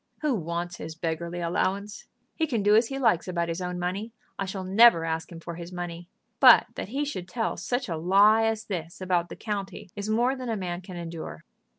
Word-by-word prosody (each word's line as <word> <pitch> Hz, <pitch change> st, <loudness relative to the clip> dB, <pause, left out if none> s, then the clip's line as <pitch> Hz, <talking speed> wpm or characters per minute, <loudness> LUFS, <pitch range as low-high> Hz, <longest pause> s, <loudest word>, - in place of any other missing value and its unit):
Who 300 Hz, -3 st, +1 dB
wants 175 Hz, -2 st, -3 dB
his 160 Hz, +1 st, -7 dB
beggarly 170 Hz, +1 st, -3 dB
allowance! 200 Hz, +5 st, -2 dB, 0.3 s
He 320 Hz, -, 0 dB
can 235 Hz, -8 st, -1 dB
do 205 Hz, +1 st, +5 dB
as 225 Hz, +1 st, +5 dB
he 270 Hz, -, -4 dB
likes 230 Hz, -11 st, +2 dB
about 170 Hz, -2 st, -1 dB
his 165 Hz, +2 st, -3 dB
own 180 Hz, 0 st, -3 dB
money. 190 Hz, +6 st, -3 dB, 0.3 s
I 195 Hz, -, 0 dB
shall 190 Hz, 0 st, -5 dB
never 190 Hz, -2 st, +6 dB
ask 160 Hz, +2 st, -3 dB
him 165 Hz, -, -8 dB
for 170 Hz, +1 st, -7 dB
his 170 Hz, +1 st, -8 dB
money. 175 Hz, -1 st, -6 dB, 0.3 s
But -, -, +9 dB
that -, -, -6 dB
he 280 Hz, +5 st, -1 dB
should 185 Hz, -12 st, -5 dB
tell 225 Hz, +5 st, -2 dB
such 250 Hz, +1 st, -2 dB
a 165 Hz, -4 st, -3 dB
lie 200 Hz, +6 st, +5 dB
as 225 Hz, -1 st, -1 dB
this 170 Hz, -4 st, -5 dB
about 180 Hz, -2 st, 0 dB
the -, -, -7 dB
county 200 Hz, -4 st, -5 dB
is 205 Hz, +1 st, -4 dB
more 240 Hz, +4 st, +2 dB
than 255 Hz, -2 st, -6 dB
a 225 Hz, -, -1 dB
man 180 Hz, -2 st, -4 dB
can 185 Hz, -1 st, -9 dB
endure." 165 Hz, -, -7 dB
185 Hz, 220 wpm, -27 LUFS, 170-220 Hz, 0.3 s, But